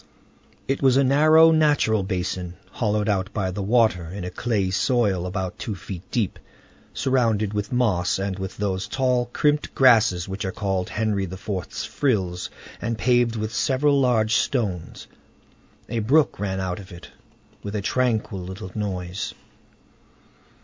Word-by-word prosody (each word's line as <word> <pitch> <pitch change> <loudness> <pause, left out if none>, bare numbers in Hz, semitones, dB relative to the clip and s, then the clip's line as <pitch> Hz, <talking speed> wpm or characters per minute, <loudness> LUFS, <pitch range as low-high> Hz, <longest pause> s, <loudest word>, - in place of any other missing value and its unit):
It 135 - -1
was 130 -2 +4
a 140 - +5
narrow, 155 +4 +6
natural 150 -9 +3
basin, 90 -2 -3 0.2
hollowed 105 -2 0
out 95 -3 0
by 95 -3 -1
the 100 - -4
water 110 -4 +2
in 90 +3 -7
a 90 - -5
clayey 100 -3 -1
soil, 100 -4 +1
about 95 -1 -4
two 105 - -4
feet 90 0 -7
deep, 110 -6 -1 0.5
surrounded 115 -6 +1
with 105 0 -3
moss 105 -8 +1
and 95 0 -3
with 95 +1 -6
those 95 -2 -2
tall, 125 -2 +1
crimped 150 +4 0
grasses 110 -8 +4
which 95 +1 -5
are 95 - -2
called 95 -2 -2
Henry 105 -3 -1
IV.'s 95 +1 -5
frills, 95 -10 -1 0.3
and 115 0 -2
paved 120 0 +2
with 110 0 -3
several 140 +5 +2
large 115 -3 +3
stones. 100 -10 -2 0.8
A 115 - -2
brook 125 0 +2
ran 95 -2 -2
out 95 0 -3
of 100 0 -12
it, 85 -1 -11 0.5
with 100 +1 -6
a 105 - -1
tranquil 115 -5 0
little 95 +1 -7
noise. 100 -1 -4
105 Hz, 150 wpm, -23 LUFS, 95-120 Hz, 0.8 s, narrow